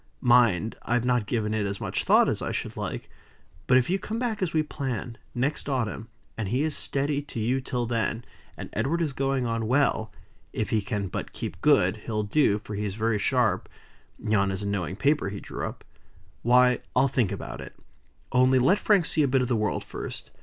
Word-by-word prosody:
Mind! 120 -4 +4
I've 120 +1 0
not 125 -4 +1
given 110 -3 -1
it 105 -2 0
as 100 0 -4
much - - -2
thought - - +5
as - - -1
I - - -2
should - - -4
like. - - -4 0.6
But 130 - +6
if 125 - +2
you 190 +2 +1
come 220 +3 -4
back 230 -4 -2
as 180 -3 0
we 155 -1 +2
plan, 130 -6 -4 0.2
next 140 +4 -1
autumn, 115 -4 -2 0.3
and 110 -3 -3
he 125 +8 +1
is 155 -1 -1
steady 140 +1 -1
to 145 -5 -7
you 125 +5 +1
till 125 -2 -2
then 115 0 -1 0.3
and - - -7
Edward 165 +5 0
is 150 -4 -2
going 135 -1 0
on 115 -1 -1
well 125 -4 +2 0.4
(if - - -2
he 110 - +2
can 100 -2 -2
but 90 - -5
keep - - -6
good, - - +4
he'll 105 -2 -3
do, 105 -1 +3
for 105 0 -8
he 105 +1 -2
is 100 -2 -3
very 110 -1 0
sharp - - +1 0.5
yon 105 -2 +1
is 95 +1 -3
a - - -3
knowing 95 -3 -2
paper 140 -1 +1
he 100 0 -6
drew - - -5
up) - - -9 0.6
why, 125 +1 +5 0.2
I'll 135 - +5
think 120 -6 +1
about 100 - -6
it. - - -10 0.6
Only 130 +1 +4
let 175 +11 +4
Frank 200 -6 +3
see 160 - +1
a 145 - +3
bit 130 0 +2
of 125 - -3
the 120 - +2
world 105 -1 -1
first. - - -7
120 Hz, 210 wpm, -26 LUFS, 105-135 Hz, 0.6 s, But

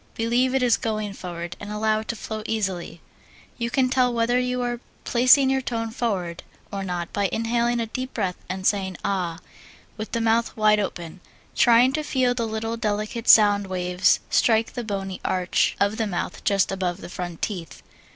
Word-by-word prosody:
Believe 245 +3 +1
it 265 - +2
is 240 -3 +4
going 215 -2 -3
forward, 175 -2 -6
and 205 0 -7
allow 215 +1 +1
it 220 - -8
to 235 - -2
flow 220 0 -5
easily. 190 -6 -3 0.6
You 235 0 -1
can 260 +1 +2
tell 250 -1 +2
whether 235 +1 +1
you 250 0 -1
are 240 -1 -2 0.2
placing 255 +2 +5
your 265 0 +1
tone 230 -3 -3
forward 195 -8 -2 0.3
or 195 -1 -3
not 175 -2 -4
by 200 -2 +1
inhaling 235 +1 0
a 230 - 0
deep 255 +4 -6
breath 190 -5 -1
and 185 0 -4
singing 190 -4 +1
ah 180 -4 -1 0.6
with 215 +1 -6
the 230 - +1
mouth 225 0 +1
wide 215 -1 +4
open, 175 -3 -5 0.4
trying 240 +2 +5
to 305 - 0
feel 260 -4 +1
the 235 -2 -2
little 225 +1 -3
delicate 215 +1 -2
sound 205 -2 +6
waves 180 0 +2
strike 225 -1 +3
the 245 - -4
bony 195 -3 -4
arch 185 -1 +1
of 200 +2 +1
the 225 - 0
mouth 175 -3 -4
just 195 -2 +2
above 185 -2 -2
the - - -7
front 175 -2 -6
teeth. 170 -9 -5
215 Hz, 185 wpm, -24 LUFS, 190-235 Hz, 0.6 s, sound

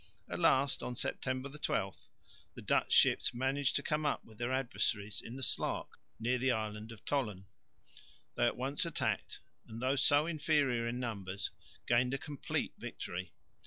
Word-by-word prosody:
At - - -4
last 135 0 +4
(September 130 +2 -1
12) 150 +2 -3 0.5
the - - -8
Dutch - - +2
ships - - +5
managed 135 +3 +1
to 140 - +2
come 150 +2 0
up 150 - 0
with 110 -1 -16
their 120 +1 -1
adversaries 110 -5 0
in 115 - -8
the 135 - -4
Slaak - - 0 0.3
near 125 +2 +1
the 130 +1 +3
island 110 -1 -3
of 115 -2 -12
Tholen. 105 -10 -1 0.9
They 120 - +3
at - - -1
once 135 +3 0
attacked 170 -2 -2 0.3
and 110 +1 -7
though 130 +2 +2
so 145 +2 +5
inferior 145 -7 +1
in 120 +1 -2
numbers 100 -6 -3 0.3
gained 125 +2 +3
a - - -1
complete 145 -1 -3
victory. 90 -1 -5
125 Hz, 160 wpm, -34 LUFS, 115-140 Hz, 0.9 s, ships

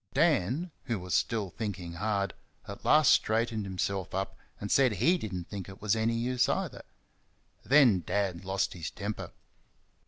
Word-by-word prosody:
Dan, 150 - +2
who 120 -4 -1
was 90 -1 -5
still 105 -6 0
thinking 95 -5 -5
hard, 100 +2 -1 0.3
at - - -8
last 155 0 +6
straightened 110 -1 +1
himself 95 -1 -3
up 95 0 -2 0.2
and 105 - -4
said 130 -4 +4
HE 175 - +3
did 110 - -5
n't 90 -2 -5
think 95 -3 -6
it 95 - -11
was 105 0 +1
any 115 +1 +1
use 125 +2 +1
either. - - -2 0.8
Then 130 -8 +5
Dad 95 0 -1
lost 95 0 -1
his 85 -3 -5
temper. 105 +1 -5
105 Hz, 160 wpm, -30 LUFS, 95-120 Hz, 0.8 s, last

